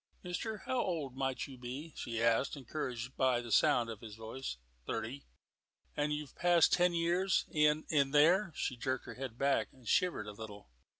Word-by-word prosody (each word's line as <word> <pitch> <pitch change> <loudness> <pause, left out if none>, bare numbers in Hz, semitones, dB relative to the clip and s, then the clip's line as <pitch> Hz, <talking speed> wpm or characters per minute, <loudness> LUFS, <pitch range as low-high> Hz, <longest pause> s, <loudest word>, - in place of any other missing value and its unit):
"Mister, 200 +5 -3
how 260 -1 +1
old 155 -8 -2
might 135 -1 -1
you 130 -3 -11
be?" 135 +6 -6
she 115 -1 -3
asked, 115 +5 +2
encouraged 125 -2 -4
by 130 -2 +3
the 120 -1 -7
sound 120 +3 +4
of 110 -2 -7
his 110 -3 -9
voice. 110 - -6 0.3
"Thirty." 130 +6 -4 0.7
"And 150 0 0
you've 150 -2 -4
passed 175 -2 +4
ten 175 -1 +4
years 175 +3 +2
in 150 0 +3
in 140 -3 +3
there." 170 +7 +5
She 130 - -2
jerked 130 +2 -2
her - - -7
head 130 -3 -6
back 140 +1 +2
and 130 -3 -17
shivered 175 -10 +2
a 105 - -6
little. 105 - -10
135 Hz, 180 wpm, -34 LUFS, 120-160 Hz, 0.7 s, there